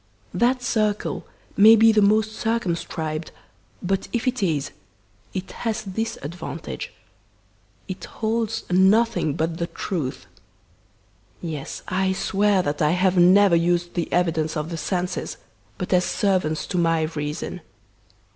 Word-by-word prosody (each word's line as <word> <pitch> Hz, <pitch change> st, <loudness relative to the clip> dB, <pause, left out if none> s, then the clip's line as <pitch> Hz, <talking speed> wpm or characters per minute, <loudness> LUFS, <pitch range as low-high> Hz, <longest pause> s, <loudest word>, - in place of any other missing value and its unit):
That 250 Hz, +1 st, +2 dB
circle 215 Hz, -4 st, -1 dB, 0.3 s
may 220 Hz, +2 st, +8 dB
be 225 Hz, 0 st, +6 dB
the 215 Hz, -1 st, +3 dB
most 215 Hz, +2 st, +3 dB
circumscribed, 170 Hz, -8 st, -2 dB, 0.5 s
but 190 Hz, +1 st, -1 dB
if 240 Hz, +1 st, -2 dB
it 255 Hz, -2 st, 0 dB
is, 155 Hz, -7 st, 0 dB, 0.6 s
it 185 Hz, 0 st, -4 dB
has 220 Hz, -2 st, -1 dB
this 225 Hz, +3 st, -3 dB
advantage 160 Hz, -, -6 dB, 1.0 s
it 185 Hz, 0 st, -6 dB
holds 225 Hz, 0 st, -2 dB
nothing 190 Hz, -3 st, +3 dB
but 165 Hz, +2 st, -2 dB
the 170 Hz, -, -1 dB
truth! 165 Hz, -8 st, -4 dB, 1.1 s
Yes, 155 Hz, -5 st, -6 dB
I 190 Hz, 0 st, +1 dB
swear 195 Hz, 0 st, +2 dB
that 145 Hz, -1 st, -2 dB
I 150 Hz, +1 st, +3 dB
have 185 Hz, +1 st, +2 dB
never 185 Hz, +1 st, +6 dB
used 175 Hz, +1 st, +1 dB
the 175 Hz, -, -2 dB
evidence 160 Hz, -3 st, +1 dB
of 150 Hz, +2 st, -3 dB
the -, -, -3 dB
senses 180 Hz, +3 st, -3 dB, 0.4 s
but 180 Hz, 0 st, -3 dB
as 180 Hz, 0 st, +4 dB
servants 185 Hz, -6 st, 0 dB
to 180 Hz, -, +1 dB
my 165 Hz, -1 st, +2 dB
reason. 155 Hz, +2 st, -4 dB
185 Hz, 130 wpm, -23 LUFS, 165-215 Hz, 1.1 s, may